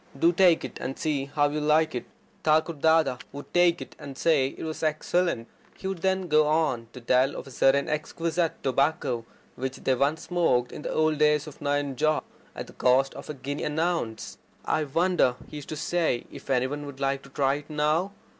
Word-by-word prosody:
Do 170 +5 +4
take 175 -2 +4
it, - - -8
and 135 +1 -4
see 145 -3 -1
how 145 +1 +1
you 150 +1 -2
like 155 +1 +3
it." 125 - -4 0.4
Thakur 155 +2 +3
Dada 160 -3 +3
would 145 +1 -10
take 175 -1 +4
it, - - -17
and 135 -2 -9
say 150 -5 +3
it - - -8
was 160 -1 -5
excellent. 155 -4 0 0.3
He - - -12
would 190 -2 -2
then 190 +1 0
go 155 -1 +4
on 150 -7 +1
to 125 - -8
tell 130 +3 +2
of - - -6
a 135 - -12
certain 135 +2 +3
exquisite 165 +2 -2
tobacco 135 -3 0 0.3
which 130 0 -4
they 130 - +1
once 140 +5 0
smoked 145 -9 +1
in - - -8
the - - -4
old 155 -1 +1
days 150 0 +3
at 150 - -11
Nayanjore 145 +1 0 0.3
at - - -5
the - - -14
cost 130 +2 +3
of - - -10
a 150 - -4
guinea 140 +2 -5
an 150 +1 -2
ounce. 165 -10 -2 0.3
"I 155 - +1
wonder," 165 -3 +2
he 150 - -8
used 145 - -9
to 155 - -4
say, 165 -1 +1
"I - - -3
wonder - - -17
if - - -11
any 130 -1 +2
one 145 +2 -4
would 140 -1 -9
like 135 0 0
to 135 - -15
try 135 -1 +1
it 145 +1 -6
now. 155 +5 +1
150 Hz, 215 wpm, -27 LUFS, 135-160 Hz, 0.4 s, Do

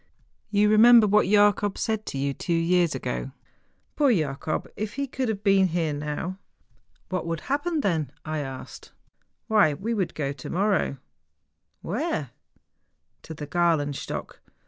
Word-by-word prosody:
' - - -45
You 210 0 +3
remember 225 +2 +7
what 210 -1 +3
Jacob 205 0 +3
said 220 -1 -2
to - - -4
you 140 +1 -1
two 170 +4 -2
years 170 -1 +2
ago? 130 +1 -4 0.6
Poor 285 -3 +4
Jacob, 155 - -1
if 210 0 -4
he 280 +1 -1
could 260 -2 -3
have 210 -2 -3
been 195 -2 +4
here 165 -3 -1
now! 150 +6 -4 0.3
' - - -39
'What 185 -3 -3
would 165 -1 -3
happen 295 - -1
then 160 - -1
?' - - -45
I - - -1
asked 135 -2 -7
him. - - -29 0.3
' - - -50
Why, 205 -9 +4
we 220 +9 -3
would 190 -6 -2
go 140 -2 -2
to 135 - -9
morrow 195 -6 0 0.4
' 75 0 -51
'Where?' 210 - -2 0.5
' - - -49
To 160 - -8
the 150 - -6
Gralenstock. 150 -3 -1
180 Hz, 170 wpm, -25 LUFS, 150-215 Hz, 0.6 s, remember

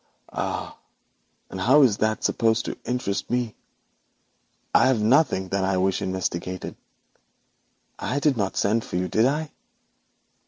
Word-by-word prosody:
'Ah! - - -3 0.8
And 95 - -5
how 135 +8 +6
is 110 -6 +3
that 110 0 0
supposed 115 0 +1
to - - -4
interest 125 -5 -2
me? 120 -2 -1 1.2
There 130 - +5
is - - -3
nothing 110 - +2
that 100 0 0
I 95 0 +1
wish 95 0 +1
investigated. 95 -1 -3 1.2
I 125 - -2
did 145 -1 +2
not 100 -4 -2
send 110 +3 +1
for - - -7
you, 90 +1 0
did 110 +7 +3
I?' 150 +3 -2
110 Hz, 135 wpm, -24 LUFS, 95-125 Hz, 1.2 s, how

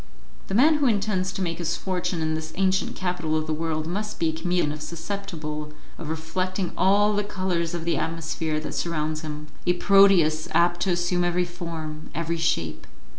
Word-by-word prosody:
The 195 - -2
man 300 +7 +6
who 285 - +3
intends 200 -4 +1
to 190 - -3
make 165 -1 -2
his 170 0 -1
fortune 180 -3 -2
in 155 0 0
this 160 0 -4
ancient 190 0 +1
capital 175 -4 -1
of 155 - -1
the 155 - -1
world 155 0 -1
must 210 +6 -3
be 165 - +2
a - - -2
chameleon 160 -2 0
susceptible 155 -3 -5 0.3
of 155 - -5
reflecting 180 +4 -2
all 200 +3 +4
the 205 0 +1
colours 185 -4 -1
of 165 -1 -4
the 170 -3 +1
atmosphere 160 -1 -2
that - - -5
surrounds 155 -2 -1
him 150 -1 -6 0.2
a 180 - +5
Proteus 180 -5 +5
apt 175 +1 +3
to 195 - +1
assume 175 0 +1
every 175 0 +1
form, 165 -3 -6
every 170 +1 -1
shape. 85 - -1
170 Hz, 180 wpm, -25 LUFS, 160-185 Hz, 0.3 s, man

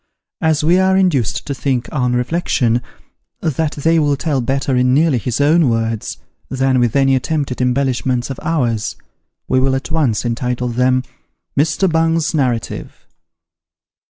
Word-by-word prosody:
As 160 -1 +1
we 175 +4 +4
are 190 0 +3
induced 140 - +1
to 140 - -3
think, 130 -3 -1
on 125 -4 0
reflection, 125 -3 0 0.6
that 160 -1 -1
they 165 +3 +2
will 145 -2 +2
tell 140 -2 -1
better 135 +2 -1
in 125 +1 +3
nearly 150 -4 +3
his 115 +3 -3
own 150 0 +4
words, 115 -1 -2 0.3
than 130 -1 +1
with 120 0 +1
any 135 -1 +4
attempted 135 -1 -2
embellishments 125 0 0
of 135 - -6
ours, 120 -9 -1 0.5
we 130 - +2
will 130 0 +2
at 135 - -5
once 135 -9 0
entitle 125 +1 -2
them 125 +2 +1 0.5
MR. 150 +6 +2
BUNG'S 165 0 +1
NARRATIVE. 125 -7 -1
135 Hz, 145 wpm, -17 LUFS, 125-155 Hz, 0.6 s, we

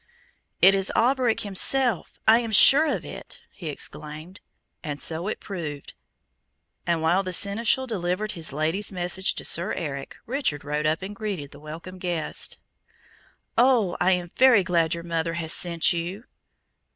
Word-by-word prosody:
"It 190 +2 +8
is 195 -1 +1
Alberic 250 -1 +2
himself, 220 +2 +1
I 225 +1 +7
am 230 -2 -4
sure 280 +8 +8
of - - -3
it!" - - -8
he 170 - -9
exclaimed, 155 +4 -5 0.4
and 145 -3 -5
so 165 +5 -2
it 215 - -3
proved; 155 -8 -7 0.9
and 170 -2 0
while 175 +4 +3
the 185 -1 -5
Seneschal 225 +8 +2
delivered 205 -2 -2
his 160 -4 -3
Lady's 160 +9 -2
message 180 +1 -1
to - - -5
Sir 170 +5 -1
Eric, 140 -5 -5
Richard 240 - -2
rode 150 +1 -1
up 160 +3 -1
and 200 +2 -6
greeted 195 -10 -5
the 140 - -13
welcome 165 +5 -9
guest. 175 -3 -3 1.0
"Oh, 240 -8 +3
I 185 +1 +3
am 175 -1 -3
very 255 -6 +5
glad 170 -2 +1
your 170 - -7
mother 165 -1 -2
has 165 -1 -1
sent 170 -2 +2
you!" 175 +6 -5
180 Hz, 155 wpm, -25 LUFS, 160-210 Hz, 1.0 s, It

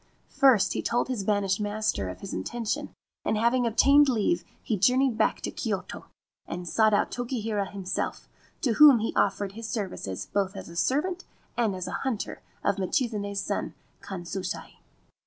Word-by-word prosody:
First 260 -8 +4
he - - -1
told 240 +2 0
his 240 -6 -2
banished 200 -1 +1
master 205 - -1
of 90 0 -8
his - - -6
intention, 225 - -3 0.3
and 220 - 0
having 235 +2 +2
obtained 280 +5 +5
leave 250 +8 +1 0.2
he 225 - 0
journeyed 250 +5 +3
back - - +1
to - - -3
Kyoto, - - -4 0.4
and 175 +1 -5
sought 215 +4 +3
out - - +1
Tokihira 225 -5 -2
himself, 190 -2 -3 0.3
to 245 -5 +2
whom 290 -1 +8
he 225 0 -2
offered 200 0 +1
his 225 +2 -7
services 185 - -4
both 200 0 -1
as - - -8
a 170 - -11
servant 335 - 0 0.3
and 225 -5 +1
as 185 -1 -4
a - - -4
hunter 260 -6 -3 0.2
of 200 0 +1
Michizane's 200 -1 -1
son - - -3 0.3
Kanshusai. 185 - -5
215 Hz, 160 wpm, -27 LUFS, 195-245 Hz, 0.4 s, whom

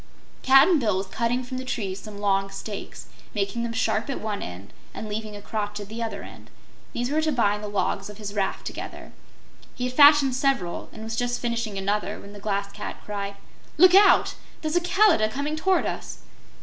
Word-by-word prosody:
Cap'n 275 +6 +6
Bill 210 -7 +1
was 190 - -2
cutting 235 +5 -1
from 255 +1 -5
the - - -5
trees 200 -6 -3
some 210 -1 -10
long 195 -1 +1
stakes, 200 +1 -7 0.3
making 200 +3 -1
them 235 0 -2
sharp 225 +1 0
at 275 - -2
one 210 -1 -3
end 90 +3 -8 0.2
and 220 - -5
leaving 210 0 -5
a 205 - -10
crotch 210 -1 -3
at 205 -1 -8
the 225 +2 -6
other 215 -3 -4
end. - - -12 0.4
These 245 +2 -2
were 310 +1 +2
to 315 0 +1
bind 210 -5 +1
the - - -3
logs 200 0 -1
of 210 - -10
his 205 -2 -6
raft 200 -2 -2
together. - - -7 0.6
He 250 - -4
had 250 0 -2
fashioned 285 -1 +7
several 265 -10 0
and 220 - -9
was 225 0 -4
just 245 0 -1
finishing 230 -4 -2
another 200 +2 -1
when 200 - -12
the 205 - -10
Glass 200 -1 -2
Cat 210 - -6
cried: 200 -1 -4 0.4
"Look 365 +3 +7
out! 400 +1 +6 0.3
There's 310 +1 -1
a 350 - +4
Kalidah 355 - +4
coming 285 +6 -2
toward 370 +4 +2
us." - - -5
220 Hz, 200 wpm, -25 LUFS, 205-260 Hz, 0.6 s, fashioned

